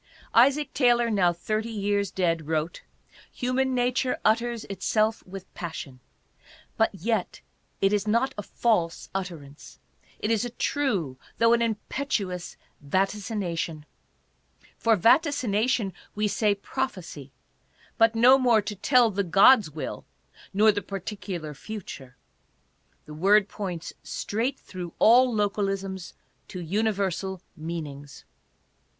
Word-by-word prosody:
Isaac 275 +5 +4
Taylor, 240 -3 +3
now 185 -4 +3
thirty 215 +6 -3
years 205 -2 -1
dead, 165 -5 -1
wrote: 160 +1 -2 0.5
"Human 255 +1 0
nature 250 +1 +1
utters 230 +1 +1
itself 215 +3 0
with 190 0 -10
passion; 150 -6 -7 0.8
but 225 - +3
yet 210 +1 -2 0.4
it 195 +1 +3
is 210 0 0
not 235 +5 +1
a - - -4
false 195 -6 -1
utterance; 165 -7 -7 0.4
it 215 - -2
is 225 0 +2
a 245 - -3
true 205 - -1 0.2
though 230 0 +4
an 235 - +2
impetuous 215 -5 -3 0.2
vaticination." 185 -2 -2 0.9
For 230 -1 +3
vaticination 235 - +2 0.2
we 210 0 +1
say, 210 0 +1
prophecy, 190 - -5 0.7
but 225 0 +5
no 250 +4 +6
more 235 -5 +4
to 210 - -5
tell 235 +3 +4
the 200 0 -1
god's 195 +3 +6
will, 150 -2 -6 0.5
nor 215 +2 +5
the 205 0 -3
particu 195 -1 -5
lar 155 -2 -7
future. 140 -8 -9 0.9
The 150 - -10
word 195 +6 +4
points 180 -6 -5
straight 230 +6 -3
through 180 -3 -8
all 250 +3 +6
localisms 195 -3 -2 0.3
to 185 - -7
universal 190 0 -1
meanings. 150 -3 -7
205 Hz, 120 wpm, -26 LUFS, 180-230 Hz, 0.9 s, no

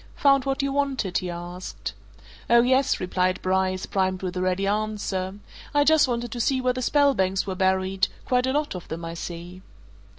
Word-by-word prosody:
"Found 275 -1 +4
what 270 0 0
you 275 0 -1
wanted?" 270 -10 0
he 185 - -5
asked. 175 +1 -6 0.6
"Oh, 235 0 +6
yes!" 260 +2 +2
replied 185 0 0
Bryce, 185 0 0
primed 185 -1 -1
with 185 0 -3
a 180 - -1
ready 185 +1 0
answer. 200 -2 -2 0.4
"I 290 - +5
just 310 -1 +5
wanted 240 -1 -2
to 240 - -5
see 260 +3 +1
where 255 0 +1
the 255 - -4
Spelbanks 245 -10 +2
were 195 - -3
buried 190 0 +1 0.2
quite 250 0 +2
a - - +1
lot 295 +1 0
of 180 -2 -8
them, 165 +1 -5
I 165 - -5
see." 175 +2 -7
195 Hz, 190 wpm, -25 LUFS, 185-260 Hz, 0.6 s, Oh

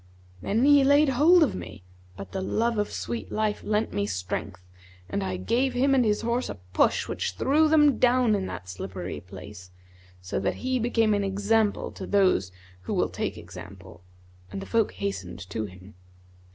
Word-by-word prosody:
Then 225 - +1
he 285 -1 +6
laid 285 +2 +5
hold 315 +7 +5
of 280 - 0
me 90 +1 -8 0.3
but 100 -1 -8
the 190 - -3
love 225 +3 0
of 205 - -1
sweet 235 - -5
life 215 -1 -1
lent 215 +1 -1
me 100 0 -1
strength 90 -1 -4 0.4
and 95 - -2
I 95 -1 -3
gave 250 - 0
him 270 +2 +3
and 260 -2 +4
his 210 -2 +1
horse 235 +2 -1
a - - -5 0.2
push - - +2
which 90 - -3
threw 290 - +3
them 295 -3 +4
down 245 -2 +4
in 195 -2 -1
that 90 - -7
slippery 90 0 -6
place, 95 0 -11 0.5
so 90 0 -3
that 95 - -1
he 255 0 +1
became 225 -2 +2
an 205 -1 +1
example 205 +2 +1
to 190 - -8
those 185 - +2 0.3
who 95 - -3
will - - +1
take - - -4
example; 90 0 -11 0.5
and 100 - -5
the - - -7
folk 225 -2 +1
hastened 195 - -5
to 110 +1 -2
him. 95 +1 -13
200 Hz, 180 wpm, -26 LUFS, -, 0.5 s, he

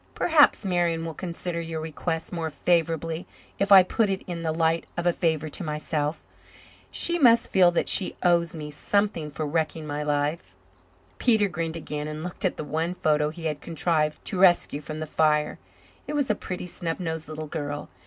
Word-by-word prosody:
Perhaps 300 -9 +4
Marian 170 -3 +1
will 165 - -4
consider 170 0 -4
your 165 -1 -4
request 160 +1 -4
more 165 -2 -2
favourably 165 0 0 0.3
if 200 0 0
I 190 -2 +10
put 210 +3 +1
it 190 -1 -2
in 175 -2 -5
the 160 -1 -1
light 165 +1 +1
of 175 - -2
a 175 - +4
favour 160 -3 0
to 180 - -6
myself. 150 -1 -2 0.6
She 345 0 0
must 235 -5 +5
feel 185 -2 +6
that 175 - 0
she 190 - 0
owes 170 -1 +3
me 150 -1 -6
something 200 0 0
for 150 +1 -4
wrecking 160 +1 -1
my 145 0 -3
life." 145 - -1 0.6
Peter 220 -4 +4
grinned 165 -3 -3
again 150 -2 -4
and 155 +1 -5
looked 180 0 -3
at - - 0
the - - -4
one 165 +4 -2
photo 150 -3 +2
he 165 +1 -8
had 150 -2 -2
contrived 155 -2 0
to 190 - -3
rescue 175 -5 +4
from 155 +1 -7
the 155 - -3
fire. 150 -1 +1 0.5
It - - -4
was 285 -6 +1
a - - +3
pretty, 185 -3 -6
snub 170 -1 -4
nosed 160 -3 -4
little 155 0 -5
girl. 145 -1 -4
165 Hz, 190 wpm, -26 LUFS, 155-180 Hz, 0.6 s, I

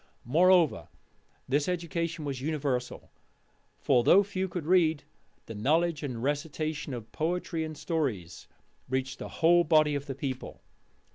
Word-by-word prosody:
Moreover, 165 - +3 0.6
this 145 +2 +1
education 170 -2 -3
was 135 -3 -4
universal; 140 -4 -3 0.7
for, 125 -3 +2
though 195 +10 +6
few 190 -1 -3
could 175 -3 -5
read, 160 -4 +3 0.4
the - - -8
knowledge 155 +8 +1
and 125 -6 -5
recitation 150 0 -2
of 110 -2 -9
poetry 165 0 -2
and 155 -1 -6
stories 120 - -3 0.4
reached 130 +1 -2
the - - -6
whole 175 +1 +4
body 155 -2 +3
of 140 0 -3
the 135 - -4
people. 135 -1 -6
150 Hz, 135 wpm, -29 LUFS, 130-170 Hz, 0.7 s, though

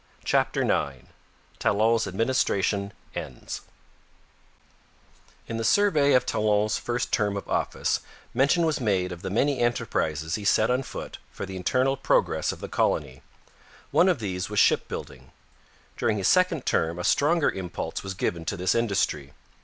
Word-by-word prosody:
CHAPTER - - +1
IX 65 -3 -1 0.5
TALON'S 110 +2 +2
ADMINISTRATION 100 -2 0 0.2
ENDS - - -6 1.9
In 115 - -4
the 115 - -2
survey 155 - +4
of 125 -1 +4
Talon's 105 -1 +1
first 120 +1 -2
term 105 -2 +1
of 100 - -6
office - - 0 0.3
mention 140 +7 +3
was 155 -4 0
made 95 -5 +1
of 90 -1 -7
the 95 - -4
many 130 +7 +1
enterprises 80 -10 -1
he 105 - -2
set 110 +3 +3
on 125 +1 +1
foot - - -8
for - - -6
the 95 0 -8
internal 130 +9 +1
progress 135 - +1
of - - -10
the - - -5
colony. 65 +1 -1 0.7
One 185 - +5
of 180 - +2
these 95 -5 -3
was - - -5
shipbuilding. 65 -2 0 0.7
During 105 - +1
his 95 - 0
second 180 -6 +3
term 80 +1 0
a 90 - -4
stronger 150 - +3
impulse 95 -2 -5
was 95 -1 -6
given 85 -2 -2
to 100 - -2
this 90 +1 +1
industry. 100 -11 0
105 Hz, 150 wpm, -26 LUFS, 90-130 Hz, 1.9 s, One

